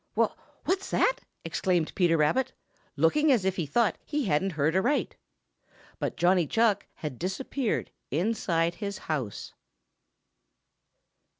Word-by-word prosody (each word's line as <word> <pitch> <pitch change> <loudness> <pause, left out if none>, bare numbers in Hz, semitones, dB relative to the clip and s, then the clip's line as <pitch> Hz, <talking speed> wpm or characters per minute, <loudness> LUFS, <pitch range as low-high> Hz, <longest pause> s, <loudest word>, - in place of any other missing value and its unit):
"Wha - - +3 0.4
what's 380 +1 0
that?" - - +2 0.3
exclaimed 175 -4 0
Peter 175 -3 +3
Rabbit, 155 - +2 0.4
looking 300 0 +4
as 225 -8 +3
if 190 -1 +1
he 165 -5 -1
thought 230 +9 +1
he 295 -3 -2
hadn't 185 +2 +1
heard 155 +2 +1
aright. 245 +10 +1 0.8
But - - -2
Johnny 175 -2 +3
Chuck 220 0 +2
had 145 -6 -6
disappeared 220 +6 -2 0.2
inside 170 -1 +1
his 200 +2 -5
house. 140 - -4
190 Hz, 120 wpm, -28 LUFS, 165-235 Hz, 0.8 s, looking